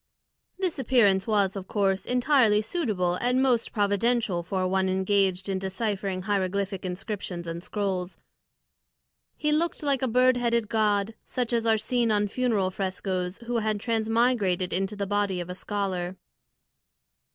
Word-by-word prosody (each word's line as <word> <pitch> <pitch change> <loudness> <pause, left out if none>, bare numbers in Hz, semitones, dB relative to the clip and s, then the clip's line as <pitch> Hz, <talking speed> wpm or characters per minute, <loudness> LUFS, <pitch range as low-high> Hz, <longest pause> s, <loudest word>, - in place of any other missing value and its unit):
This 370 -6 -2
appearance 215 -7 +3
was 205 -3 +2
of 190 -1 -6
course 195 -2 0
entirely 250 -4 +4
suitable 215 - -1
and 250 +4 +1
most 255 -3 +2
providential 205 -2 +1
for 185 +2 -1
one 190 0 +1
engaged 190 0 +1
in 190 -1 -1
deciphering 190 -1 -3
hieroglyphic 195 -1 -1
inscriptions 180 -1 -5
and 165 +1 -5
scrolls. 190 -3 -3 1.2
He 300 - 0
looked 315 +1 0
like 280 -3 +1
a 260 - +1
bird 250 +1 +4
headed 235 -3 0
god, 210 -1 +1
such 245 -1 -3
as 230 -1 +1
are 220 -1 +4
seen 235 +2 0
on 210 -1 +2
funeral 215 -6 0
frescoes, 185 -1 -3
who 240 0 -1
had 215 -1 -1
transmigrated 225 -5 +1
into 195 +3 -1
the 200 -1 -2
body 200 -2 0
of 175 +1 -5
a - - -4
scholar. 190 -2 -3
205 Hz, 145 wpm, -26 LUFS, 190-235 Hz, 1.2 s, entirely